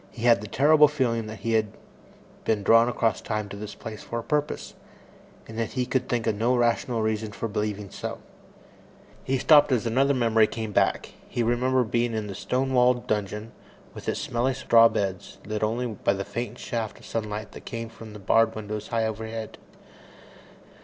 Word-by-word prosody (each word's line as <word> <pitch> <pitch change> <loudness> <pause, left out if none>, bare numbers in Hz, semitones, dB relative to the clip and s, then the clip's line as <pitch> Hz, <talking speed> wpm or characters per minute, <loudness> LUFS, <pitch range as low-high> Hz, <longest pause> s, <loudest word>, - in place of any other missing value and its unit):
He 115 - -9
had 115 -4 +5
the 105 - -7
terrible 150 +7 +5
feeling 120 -6 -1
that 110 -2 -8
he 115 +2 -1
had 110 -2 +1 0.7
been 105 -2 0
drawn 115 +3 +6
across 115 -2 0
time 105 -1 -3
to 100 - -7
this 105 +1 -7
place 110 -2 -8
for 115 - -5
a 115 - -3
purpose, 150 +2 -2 0.7
and 110 0 -7
yet 115 -1 -2
he 125 -2 0
could 130 0 -1
think 120 -2 0
of 110 - +2
no 115 +5 +1
rational 120 -1 +1
reason 110 -1 -2
for 115 - -3
believing 105 -2 -3
so. - - -5 1.1
He 135 - 0
stopped 145 +1 +6
as 125 -3 +1
another 135 +5 +2
memory 115 -3 +4
came 110 -1 -5
back. - - +1 0.2
He 120 - -1
remembered 125 0 +1
being 120 -1 +1
in 110 -1 -2
the 100 - -6
stone 130 +7 -1
walled 125 -1 +3
dungeon, 105 +1 -2 0.4
with - - -5
its - - -1
smelly 125 +2 0
straw 115 -3 +6
beds, 95 -4 -3
lit 105 0 -3
only 115 +3 0
by 105 -4 0
the 100 0 -4
faint 120 +5 -5
shaft 115 -3 -4
of - - -15
sunlight 105 -1 -4
that - - -12
came 115 -2 -5
from 115 -1 -12
the - - -8
barred 115 +3 +3
window 105 0 -4
high 110 +1 -1
overhead. 110 0 -5
115 Hz, 190 wpm, -26 LUFS, 105-120 Hz, 1.1 s, drawn